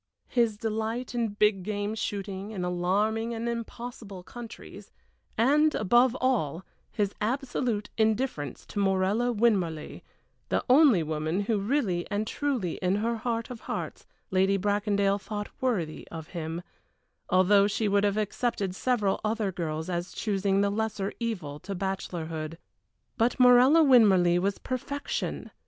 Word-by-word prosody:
his 230 -4 +1
delight 225 +3 -3
in 235 -1 0
big 205 -1 +2
game 205 +2 -2
shooting 200 -2 -4
in 190 -5 -4
alarming 210 +6 0
and 230 +1 -3
impossible 235 -4 -6
countries 235 +3 -10 0.5
and, 295 +6 +4
above 240 +5 +3
all, 190 - 0 0.3
his 205 -2 -1
absolute 240 -2 -1
indifference 220 - 0
to 205 - -5
Morella 200 +5 +2
Winmarleigh, 195 -9 0 0.5
the - - 0
only 260 - +6
woman 155 +4 -1
who 210 +1 0
really 200 -6 0
and 205 +1 -1
truly 245 - -2
in 185 +1 +2
her 230 +3 0
heart 230 +1 -3
of 240 - -7
hearts - - -5 0.2
Lady 190 +1 +3
Bracondale 200 0 +1
thought 205 0 -5
worthy 195 -12 -1
of 160 -1 -8
him, 165 0 -5 0.7
although 200 +2 +5
she 210 +1 -1
would 200 0 +2
have 205 0 +1
accepted 210 -2 -1
several 210 -2 0
other 215 -2 0
girls 160 -3 -3
as 175 0 -3
choosing 195 -2 0
the 200 0 +2
lesser 210 -2 -2
evil 185 -12 -4
to 195 +5 -6
bachelorhood. 165 -4 -4 0.6
But 235 +3 +2
Morella 250 +6 +7
Winmarleigh 195 - +5
was 200 +1 0
perfection! 285 - -4
205 Hz, 135 wpm, -28 LUFS, 185-235 Hz, 0.7 s, Morella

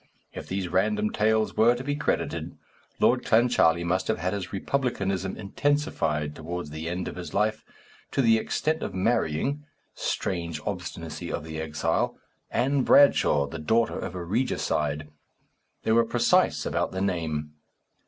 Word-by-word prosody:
If - - -7
these 95 -1 -2
random 105 +4 +1
tales 110 0 +1
were 115 +2 +5
to 125 - -5
be 145 +1 -1
credited, 145 - -2 0.4
Lord - - +3
Clancharlie 110 -8 +3
must 90 +2 0
have - - +1
had 90 +2 -2
his 100 -3 -4
republicanism 95 -5 -1
intensified 100 - 0
towards 85 -1 -5
the 80 +2 -4
end 90 +1 -3
of - - -6
his 90 - -7
life, 110 +2 +1 0.5
to 135 - +1
the 115 -1 +5
extent 155 +7 -1
of 95 - -4
marrying 115 - 0 0.3
(strange 85 -3 -2
obstinacy - - -5
of - - -3
the 80 0 -5
exile!) 80 -1 -1 0.3
Ann 135 +2 +1
Bradshaw, 125 - +5
the 80 +3 -7
daughter 110 +9 +1
of 90 - -5
a 90 - -4
regicide; 75 - -1 0.8
they - - +1
were 115 +1 +5
precise 115 - +2
about - - -1
the 95 - -2
name. 80 -6 -2
95 Hz, 150 wpm, -26 LUFS, 80-115 Hz, 0.8 s, were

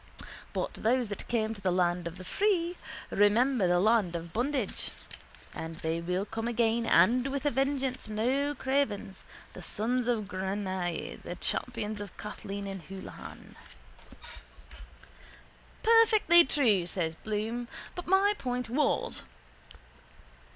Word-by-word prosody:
But - - -2
those 240 0 +1
that 205 - -6
came 225 -2 0
to 205 - -11
the 190 - +1
land 175 -1 +1
of 170 +2 -7
the 185 - -9
free 355 - +1 0.4
remember 215 +1 +4
the 175 0 +3
land 205 -3 +3
of 170 0 -6
bondage. 250 -2 -1 0.6
And 160 0 -6
they 160 +1 -2
will 180 +3 -1
come 225 +1 -4
again 230 0 +1
and 235 +10 +5
with 275 +1 -3
a 290 - +3
vengeance, 270 -2 -1
no 265 +7 0
cravens, 265 -9 -1 0.3
the - - -9
sons 240 +3 -1
of 230 -4 +1
Granuaile, 190 -2 -3
the - - -5
champions 215 -4 -3
of 205 -3 -9
Kathleen 200 -1 -6
ni 195 -1 -4
Houlihan. 195 -1 -9 2.3
—Perfectly 435 -7 +6
true, 220 - +2
says 170 -3 -2
Bloom. 220 +6 -3 0.3
But 355 - -7
my 390 +3 +4
point 250 -2 -3
was... 285 +2 +1
225 Hz, 130 wpm, -30 LUFS, 190-265 Hz, 2.3 s, Perfectly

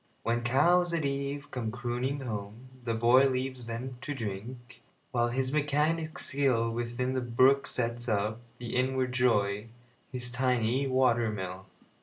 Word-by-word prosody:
When 120 +1 +1
cows 170 +9 +3
at 160 -3 0
eve 140 +1 -3
come 120 -3 -2
crooning 125 +3 -2
home, 110 +1 -6 0.2
the 115 -1 0
boyLeaves 130 +1 +3
them 120 +2 -5
to 145 +2 -4
drink, 120 +2 -7 0.3
while 120 -1 +2
his 130 +2 -1
mechanic 155 +2 +1
skillWithin 120 -4 0
the 130 - 0
brook 130 +3 +4
sets 120 0 -2
up, 105 +1 0 0.2
with 120 -1 -6
inward 130 0 +1
joy, 105 -4 +2 0.4
His 125 -1 -3
tiny 125 +1 +1
water 125 -3 +3
mill. 95 -2 -5
125 Hz, 135 wpm, -30 LUFS, 115-135 Hz, 0.4 s, brook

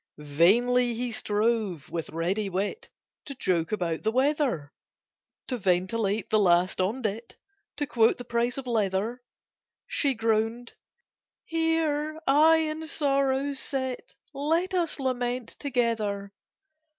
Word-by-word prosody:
Vainly 230 +12 +3
he 245 +1 -3
strove, 210 -6 -1
with 165 -2 -3
ready 185 +6 -1
wit, 195 - -3 0.4
To 275 - -7
joke 170 -9 0
about 175 -6 -1
the 215 - +1
weather— 255 - 0 0.8
To 255 - -1
ventilate 195 +2 0
the 215 - +4
last 180 -1 +3
'on 220 +8 -1
dit'— 220 +2 -4 0.4
To 290 - -1
quote 230 -4 +3
the 245 - -8
price 240 +1 0
of 270 - -5
leather— 220 +1 -1 0.6
She 275 -3 +1
groaned 225 +1 0 0.7
"Here 315 -2 0
I 310 +4 +6
and 315 0 -2
Sorrow 275 -1 +1
sit: 265 - -4 0.2
Let 325 +7 0
us 340 -5 -1
lament 250 -2 -2
together!" 220 -7 -1
235 Hz, 120 wpm, -27 LUFS, 200-275 Hz, 0.8 s, I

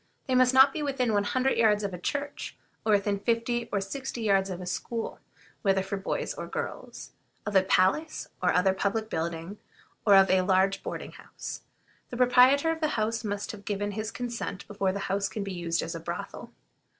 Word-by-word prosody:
They 260 - -1
must 255 0 +5
not 265 +1 +7
be 310 - -3
within 265 -5 0
one 205 0 +2
hundred 260 +5 +1
yards 210 -2 +4
of 200 -2 -2
a 180 - -6
church, 285 +9 -4 0.3
or 215 - +3
within 200 0 +1
fifty 235 +2 0
or 200 - +1
sixty 235 +4 -5
yards 195 -2 +2
of 180 -1 -5
a 180 - -6
school, 225 +5 -4 0.4
whether 195 -2 +2
for 195 +1 -3
boys 195 - -2
or - - -6
girls; - - -6 0.3
of 210 -1 -3
a 190 - +7
palace 190 +12 +1
or - - +3
other 185 +1 +3
public 210 +3 -1
building, 165 +4 -3 0.4
or 205 -2 +6
of 195 -1 +6
a 190 0 +4
large 190 +1 +2
boarding - - -6
house. - - -8 0.5
The 245 - -6
proprietor 255 +5 +5
of 325 0 -4
the 310 - +3
house 220 +1 0
must 205 -1 -3
have 205 -2 -11
given 205 0 -2
his 215 +1 -3
consent 235 -6 -5
before 200 -2 0
the 200 +1 -4
house 195 +1 0
can 200 +2 -4
be 195 -1 -5
used 170 -1 -1
as - - -4
a - - -5
brothel. - - -6
205 Hz, 200 wpm, -28 LUFS, 195-240 Hz, 0.5 s, not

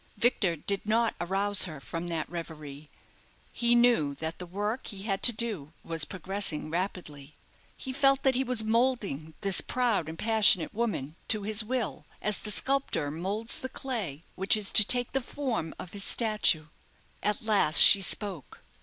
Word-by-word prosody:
Victor 205 -6 +1
did 195 +6 -4
not 230 +1 +1
arouse 195 +2 +2
her 155 -5 -9
from 165 +5 -7
that 165 -2 -4
reverie. 155 -4 -9 0.6
He 235 0 +1
knew 235 -13 +2
that 160 +3 -6
the 180 - -8
work 205 +7 -4
he 195 -3 -7
had 195 -2 -3
to 245 - +7
do 210 -10 -4
was 165 -3 0
progressing 185 -5 -2
rapidly. 160 -5 -6 0.4
He 260 - -6
felt 275 0 +2
that 265 - +2
he 260 +1 0
was 250 -3 +1
moulding 220 - -1
this 195 -2 +4
proud 235 -10 -1
and 160 - -9
passionate 215 -5 +3
woman 200 - -4
to 215 -2 0
his 215 +1 +1
will, 240 0 -4
as 210 -1 -2
the 215 - -6
sculptor 265 - -1
moulds 195 +8 -4
the 260 - -6
clay 205 - -5
which 190 +3 +2
is 205 -2 -1
to 215 - +7
take 245 +3 +3
the 270 - -2
form 240 - -4
of 180 - -10
his 200 -1 -4
statue. 210 -10 +2 0.6
At 210 +1 -2
last 205 -8 +2
she 200 - +10
spoke. 190 -5 -2
200 Hz, 170 wpm, -27 LUFS, 165-230 Hz, 0.6 s, she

